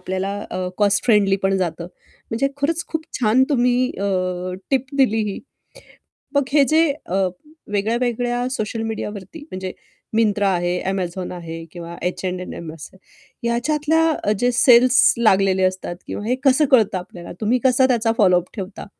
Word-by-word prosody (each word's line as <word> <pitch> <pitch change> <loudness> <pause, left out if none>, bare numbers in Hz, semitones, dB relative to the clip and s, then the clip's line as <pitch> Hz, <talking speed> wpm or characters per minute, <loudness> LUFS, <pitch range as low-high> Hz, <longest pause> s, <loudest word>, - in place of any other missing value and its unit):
आपल्याला 190 +2 -3 0.2
अ, 185 0 -3
cost 205 -1 +2
friendly 205 -4 +4
पण 195 0 +2
जातं. 170 -2 -2 0.5
म्हणजे 235 +5 0
खरंच 315 +4 -1
खूप 320 -1 -3 0.2
छान 235 +2 +4
तुम्ही 250 -1 +2
अ, 200 - -2 0.7
टिप 265 -1 +1
दिली 225 -4 +3
ही. - - -6 1.0
मग 285 - +4
हे 290 - +6
जे 325 0 +4 0.2
अ, 190 +2 0 0.5
वेगळ्यावेगळ्या 240 +3 0
सोशल 225 -2 -3
मीडियावरती 210 - -6
म्हणजे 185 0 -5 0.4
मिंत्रा 210 -2 +2
आहे, 175 0 0 0.2
Amazon 185 -1 -3
आहे 165 -2 -7
किंवा 170 -1 -8
H&M 180 -2 -4
असेल. 165 +4 -12 0.5
याच्यातल्या 300 +2 +1
जे 245 +1 +2
सेल्स 245 +1 +6
लागलेले 195 -4 +3
असतात 185 -1 -1
किंवा 205 - -5
हे 245 +3 +1
कसं 275 +2 +4
कळतं 220 -7 +4
आपल्याला 180 -1 -9
तुम्ही 230 +4 +2
कसा 260 0 +4
त्याचा 235 -3 +2
फॉलो 185 -4 +5
अप 180 - -12
ठेवता. 195 -1 -7
215 Hz, 145 wpm, -21 LUFS, 185-250 Hz, 1.0 s, हे